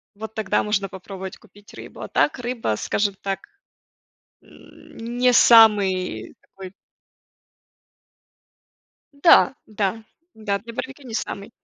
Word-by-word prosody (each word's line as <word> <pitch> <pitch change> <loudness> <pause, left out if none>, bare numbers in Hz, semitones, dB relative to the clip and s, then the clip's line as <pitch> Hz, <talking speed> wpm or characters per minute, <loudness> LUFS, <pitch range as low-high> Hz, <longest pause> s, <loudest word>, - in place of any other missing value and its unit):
Вот 220 +1 -8
тогда 215 -3 0
можно 200 -2 -1
попробовать 190 0 -9
купить 205 0 -19
рыбу. - - -11
А - - -6
так 295 - +1
рыба, 240 - -2
скажем 205 - -1
так, 195 -1 -3 1.0
не 245 +2 -4
самый 200 - +4
такой 190 -1 -12 2.4
Да, 280 -2 +5
да, 215 +1 -3 0.3
да, 205 -2 -2
для 230 +3 -11
барбекю 270 +3 -7
не 235 - -9
самый 200 0 -5
210 Hz, 110 wpm, -22 LUFS, 195-230 Hz, 2.4 s, Да